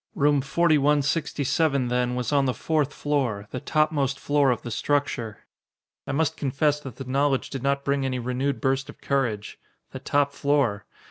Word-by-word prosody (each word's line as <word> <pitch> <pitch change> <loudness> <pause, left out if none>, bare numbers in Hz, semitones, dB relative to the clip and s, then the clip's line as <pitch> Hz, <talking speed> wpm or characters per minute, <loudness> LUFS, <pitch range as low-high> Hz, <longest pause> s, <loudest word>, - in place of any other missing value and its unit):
Room 145 0 +3
4167, 145 -1 +1
then, 125 0 0
was 125 +2 -2
on 140 -1 +3
the 130 - 0
fourth 150 -3 0
floor 130 -10 -1
the 130 - -4
topmost 145 -2 0
floor 145 -1 +2
of 125 - 0
the 120 - -6
structure. 120 -3 -1 0.6
I - - -2
must 160 +2 0
confess 145 +1 +1
that 135 -6 -9
the 135 - -7
knowledge 135 +1 0
did 135 - -4
not 140 +1 0
bring 140 0 +1
any 130 -1 -1
renewed 125 +3 -2
burst 135 0 0
of - - -11
courage! 120 -7 -2 0.3
The - - -7
top 140 0 +1
floor! 140 -9 0
140 Hz, 165 wpm, -25 LUFS, 125-145 Hz, 0.6 s, Room